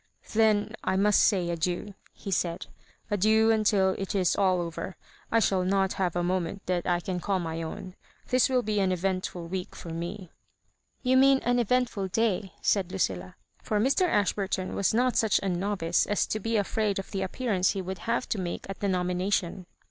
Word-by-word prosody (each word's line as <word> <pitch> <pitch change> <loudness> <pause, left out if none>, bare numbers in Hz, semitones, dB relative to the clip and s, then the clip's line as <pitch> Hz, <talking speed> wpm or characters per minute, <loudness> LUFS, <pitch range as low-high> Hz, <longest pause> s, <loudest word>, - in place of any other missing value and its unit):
" - - -16
Then 215 -1 +3
I 190 - 0
must 205 +1 +4
say 180 -4 +2
adieu," 175 +4 -2 0.2
he 195 - -8
said 170 -2 -1 0.2
— - - -33
"adieu 220 +2 +4
until 205 -3 +3
it 195 +1 -3
is 185 -3 +2
aU 185 -2 +2
over. 170 +2 -5 0.4
I 230 - +4
shall 190 -4 +2
not 190 +1 +1
have 180 -3 -1
a 175 - 0
moment 185 +1 -2
that 180 -1 -1
I 175 -1 +1
can 180 0 -3
call 195 +2 0
my 165 -2 -3
own—this 190 +8 -2
will 255 -2 +2
be 210 -1 0
an 190 -1 +2
eventful 185 -1 -2
week 180 +1 -5
for 170 - -9
me." 175 +2 -6 0.7
"You 260 0 +3
mean 270 +1 +6
an 245 +1 +2
eventful 240 -4 0
day," 200 -1 0
said 190 -3 +1
Lucilla; 90 - -2 0.3
for 210 - -1
Mr. 275 - +2
Ashburtou 195 - 0
was 200 - +1
not 245 +2 +2
such 220 -3 +3
an 180 -3 -1
novice 185 -4 0
as 205 - +1
to 215 - -2
be 225 +2 0
afraid 205 0 0
of 195 - -6
the 195 -2 -2
appearance 190 -1 0
he 195 - -3
would 190 +1 -5
have 235 +2 -1
to 210 - -1
make 175 -2 -4
at 195 - -8
the 200 - -1
nomination. 180 0 -1
195 Hz, 195 wpm, -28 LUFS, 180-215 Hz, 0.7 s, mean